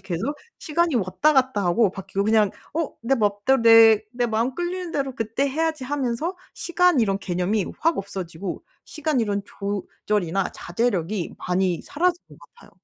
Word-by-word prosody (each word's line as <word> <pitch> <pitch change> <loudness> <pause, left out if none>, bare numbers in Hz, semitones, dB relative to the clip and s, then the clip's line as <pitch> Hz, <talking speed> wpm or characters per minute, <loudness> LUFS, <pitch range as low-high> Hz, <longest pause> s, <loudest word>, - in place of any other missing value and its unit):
계속 195 - -3 0.2
시간이 325 -2 0
왔다 230 +10 +2
갔다 260 -7 +2
하고 185 +3 +3
바뀌고 195 +1 -3
그냥 215 -2 +3 0.2
'어 325 -2 -1
내 265 +4 +2
맘대로 215 +3 +1
내 225 -1 +8
내 240 0 0
마음 230 +3 0
끌리는 350 0 -3
대로 270 -3 -2
그때 225 +5 -1
해야지.' 315 -1 -1
하면서 280 +5 -2 0.2
시간 355 -3 +2
이런 195 -3 +1
개념이 185 +2 -1
확 330 0 +2
없어지고 190 -2 -5 0.2
시간 310 -5 -1
이런 205 -2 0
조절이나 200 -2 -2
자제력이 190 -2 -2
많이 180 -1 0
사라진 350 +3 0
것 - - -16 0.2
같아요. - - -18
225 Hz, 330 characters per minute, -23 LUFS, 195-290 Hz, 0.2 s, 내